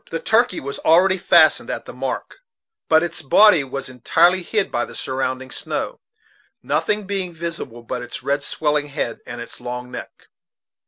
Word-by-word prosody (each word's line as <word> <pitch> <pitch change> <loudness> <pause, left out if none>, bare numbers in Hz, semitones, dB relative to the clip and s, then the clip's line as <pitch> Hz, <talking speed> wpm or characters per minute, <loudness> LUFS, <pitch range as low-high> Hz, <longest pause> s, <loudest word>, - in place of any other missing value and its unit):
The 165 - -3
turkey 225 -1 +2
was 140 +1 -6
already 185 +3 +4
fastened - - +4
at - - -4
the - - -9
"mark," - - -5 0.5
but 160 0 +5
its 170 -2 -3
body 175 +2 +6
was 135 0 -5
entirely 170 +8 +3
hid 200 +3 -1
by 120 - 0
the - - -8
surrounding 130 0 -3
snow, - - -4 0.6
nothing 165 +10 0
being 190 -3 -3
visible 165 -8 -6
but 125 +1 -4
its 120 - -8
red 140 +1 0
swelling 150 0 -1
head 140 -5 -3
and 120 -1 -7
its 120 - -9
long 125 0 -6
neck. 125 - -10
150 Hz, 165 wpm, -21 LUFS, 130-175 Hz, 0.6 s, body